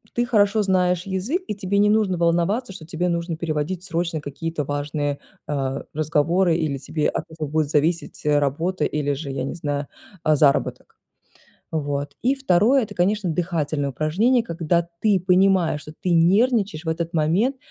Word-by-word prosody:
ты 240 - +1
хорошо 210 -2 +3
знаешь 180 -2 +1
язык, 200 - -2
и 210 - -3
тебе 200 0 -1
не 205 +1 +4
нужно 210 -4 +2
волноваться, 175 +7 +1
что 160 -4 -10
тебе 175 +1 -2
нужно 170 -1 -2
переводить 165 +2 -2
срочно 165 -3 -2
какие-то 150 +2 -4
важные, 145 0 -2 0.3
э, 135 -2 -2
разговоры 160 +4 +2
или 155 -4 -1
тебе 150 +3 -1
от - - -3
этого 155 -2 -5
будет 155 -1 +1
зависеть 160 +2 0
работа 150 +4 +1
или 145 -1 -1
же, 140 +1 -5
я 135 -1 -3
не 135 - -4
знаю, 145 -3 -3 0.4
заработок. 150 -2 +2 0.8
Вот. 145 -2 -3
И 260 +3 +3
второе- 255 +1 +3
это, - - -10
конечно, 190 +1 +1
дыхательное 155 -4 -1
упражнение, 200 - +2
когда 170 -1 0
ты 205 -4 +3
понимаешь, 185 -4 +3
что 150 - -10
ты 180 - -1
нервничаешь 195 0 +3
в - - -4
этот 165 +1 -2
момент, 175 - +2
170 Hz, 160 wpm, -23 LUFS, 150-190 Hz, 0.8 s, не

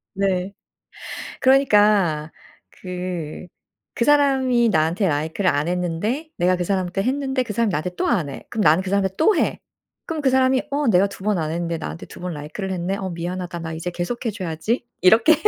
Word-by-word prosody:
네. 190 -1 0 0.9
그러니까 205 - +4 0.4
그 180 -3 -6 0.5
그 235 - +1
사람이 265 -5 +4
나한테 170 +3 +2
라이크를 160 +6 0
안 145 +2 0
했는데 180 - -2
내가 180 +1 +3
그 180 - -2
사람한테 185 0 -1
했는데 265 +1 0
그 230 - -6
사람이 225 +1 +1
나한테 175 +2 -2
또 - - 0
안 180 -12 +1
해. 135 - -9
그럼 225 - -2
나는 160 +1 +5
그 190 - -5
사람한테 195 -1 +1
또 400 +5 +4
해. - - 0 0.5
그럼 320 -3 -3
그 270 - +3
사람이 260 0 +3
'어 285 -1 0
내가 195 -1 +4
2 195 - -11
번 210 -3 +2
안 155 -1 -2
했는데 170 0 -2
나한테 160 +1 -6
두 - - -12
번 180 -1 -3
라이크를 155 +7 -5
했네. 185 +2 -2
어 190 -1 -4
미안하다. 175 0 -4
나 160 -1 -5
이제 165 +2 -4
계속해 225 +7 -3
줘야지.' 190 +5 -2 0.2
이렇게 225 - +6
190 Hz, 365 characters per minute, -22 LUFS, 170-235 Hz, 0.9 s, 이렇게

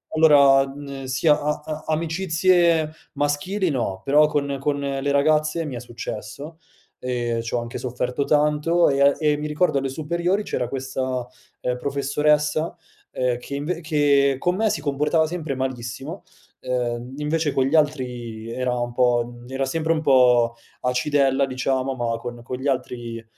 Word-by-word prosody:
allora, 140 -3 +6
mhmm, 140 0 -8
sia 150 +4 +2
a 150 0 -2
a 155 0 -6
amicizie 165 0 +2 0.2
maschili 170 +7 0
no, 115 -9 -2
però 150 +5 +5
con 140 -2 -1
con 145 +1 -1
le 140 0 -2
ragazze 155 +3 +2
mi 140 -4 -5
è - - -4
successo, 120 +5 -7 0.4
e 120 -2 -2
c'ho 120 - 0
anche 120 0 -6
sofferto 125 +2 -2
tanto 150 +4 +3
e 140 0 +1
a 140 0 +6
e 150 -1 +2
mi 150 - -4
ricordo 150 0 +1
alle 135 0 -1
superiori 170 +7 -1
c'era 125 - -2
questa, 130 -1 -3 0.3
ehm, 125 0 -1
professoressa, 150 +3 +1 0.4
ehm, 125 -1 0
che 130 +3 -7
inv 160 +5 -3
che 145 -3 +3
con 180 +4 +1
me 220 +2 +2
si 150 - -2
comportava 150 +2 +1
sempre 160 -3 -4
malissimo, 130 +5 -5 0.4
ehm, 125 0 -2
invece 150 0 0
con 130 - +2
gli 140 +4 +1
altri 125 -7 -1
era 125 +1 -1
un 120 0 -3
po' 120 -1 +1
era 135 +1 -2
sempre 160 +4 -1
un 155 - -2
po' 125 -4 +4 0.3
acidella 135 +2 +2
diciamo, 130 0 -1
ma 120 -2 -1
con 120 0 -7
con 125 +2 -5
gli 130 +3 -4
altri 120 -3 -3
140 Hz, 155 wpm, -23 LUFS, 125-150 Hz, 0.4 s, allora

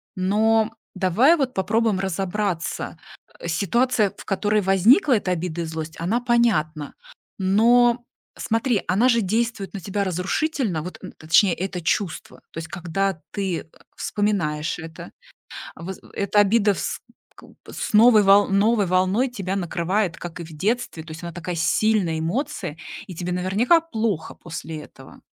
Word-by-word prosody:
Но 220 +4 +2 0.2
давай 210 - +4
вот 265 -4 -1
попробуем 220 +1 +1
разобраться. 190 -2 -2 0.4
Э, - - -6
ситуация, 210 +5 +1
в - - -11
которой 205 +2 +1
возникла 215 - +4
эта 190 -3 -2
обида 175 -1 -2
и - - -3
злость, 160 0 -6
она 205 +9 0
понятна, 195 - +1 0.4
но 235 +5 +4 0.3
смотри, 225 -1 0
она 215 +8 +3
же 235 -2 +3
действует 220 0 -1
на - - -4
тебя 200 +2 -2
разрушительно. 190 - -1
Вот 180 +4 -8
н 185 - -8
точнее, 170 +4 +4
это 180 0 -4
чувство. 175 +1 -2
То - - -12
есть 165 - -6
когда 180 +1 -2
ты, 190 -4 -2
э, - - -15 0.3
вспоминаешь 175 -8 -1
это, 160 0 -9 0.6
воз 180 +4 -7
в - - -18
эта 200 +1 +1
обида 205 0 +4
вс - - -4 0.4
купа - - -16
с - - -5
новой 220 0 +7
вол 200 +1 +6
новой 205 +1 +2
волной 185 +7 +2
тебя 195 -5 -4
накрывает, 180 +1 -1
как 175 0 -8
и - - -5
в 165 - -11
детстве. 205 -1 -2
То 160 - -11
есть 160 +2 -9
она 170 - -5
такая 175 +1 -5
сильная 170 +1 +1
эмоция, 185 - -3 0.3
и 180 - -8
тебе 180 +2 -4
наверняка 195 - +3
плохо 225 - -3
после 165 -2 -7
этого. - - -15
195 Hz, 155 wpm, -23 LUFS, 175-220 Hz, 0.6 s, новой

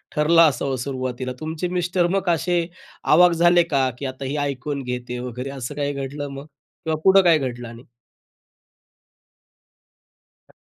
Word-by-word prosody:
ठरलं 160 +3 +4
असावं 135 -1 -3
सुरुवातीला. 130 -1 -4
तुमचे 160 +3 -3
मिस्टर 175 0 0
मग 190 -2 0
असे 170 0 +1 0.4
आवाक 175 +3 +5
झाले 175 +1 +4
का 135 -5 +1
की 140 - -5
आता 130 +1 -5
ही 135 +3 -3
ऐकून 140 0 -3
घेते 125 0 -5
आहे 125 - -4
वगैरे 125 +3 -6
असं 135 0 -6
काही 145 0 -2
घडलं 140 +1 -5
मग? 140 +1 -8 0.4
किंवा 155 -1 -1
पुढं 195 0 +7
काही 170 -3 +5
घडलं 120 -3 -5
आणि? 115 +2 -11 2.7
हां. - - -24
145 Hz, 150 wpm, -22 LUFS, 130-170 Hz, 2.7 s, पुढं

